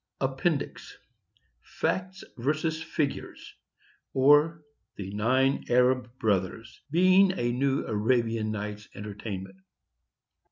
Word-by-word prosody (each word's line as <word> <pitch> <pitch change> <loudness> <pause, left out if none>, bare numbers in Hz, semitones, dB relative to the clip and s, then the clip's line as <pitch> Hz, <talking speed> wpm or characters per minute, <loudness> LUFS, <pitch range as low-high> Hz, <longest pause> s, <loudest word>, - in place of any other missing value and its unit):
APPENDIX. 135 +3 -2 0.6
FACT 185 0 -3
vs. 155 +5 -1
FIGURES; 145 -3 -4 0.6
OR, 145 +4 +4 0.3
THE 95 -1 -6
NINE 130 +6 +2
ARAB 125 0 +2
BROTHERS. 110 +2 -2
BEING 185 +3 +4
A 120 0 0
NEW 135 +2 0
ARABIAN 115 0 0
NIGHT'S 105 0 -5
ENTERTAINMENT. 100 -2 -7
125 Hz, 85 wpm, -28 LUFS, 110-150 Hz, 0.6 s, OR